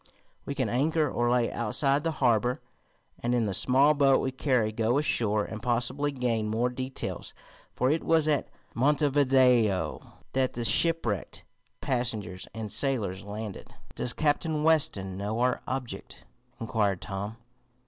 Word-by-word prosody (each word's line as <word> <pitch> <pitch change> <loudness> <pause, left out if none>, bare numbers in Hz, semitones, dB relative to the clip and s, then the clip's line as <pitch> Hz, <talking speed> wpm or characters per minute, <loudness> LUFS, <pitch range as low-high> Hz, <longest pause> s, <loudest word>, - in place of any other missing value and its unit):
We 140 - -3
can 130 -4 0
anchor 150 +7 +1
or 120 -2 0
lay 120 -1 +2
outside 135 +6 +1
the 165 - 0
harbor, 120 -2 +1 0.6
and 120 +1 0
in 120 -2 +1
the 100 - -2
small 135 +9 +4
boat 140 -2 +4
we 130 - -1
carry 125 -5 +1
go 115 +3 +1
ashore 110 -8 +1
and 110 -1 -7
possibly 125 +5 0
gain 120 -5 -1
more 115 +3 0
details. 130 +1 -5 0.4
For 130 +2 +2
it 160 - 0
was 160 -2 +2
at 150 -2 +1 0.3
Montevideo 130 -6 +3 0.3
that 130 -1 +1
the 120 -1 -3
shipwrecked 145 - +1 0.4
passengers 110 -7 -2
and 110 -2 -6
sailors 110 -9 -1
landed." 105 0 -7 0.2
"Does 125 - 0
Captain 155 0 0
Weston 100 -13 +1
know 105 +3 -3
our 125 +1 +1
object?" 130 -2 -6 0.3
inquired 105 -4 0
Tom. 100 +3 -6
125 Hz, 140 wpm, -28 LUFS, 110-140 Hz, 0.6 s, small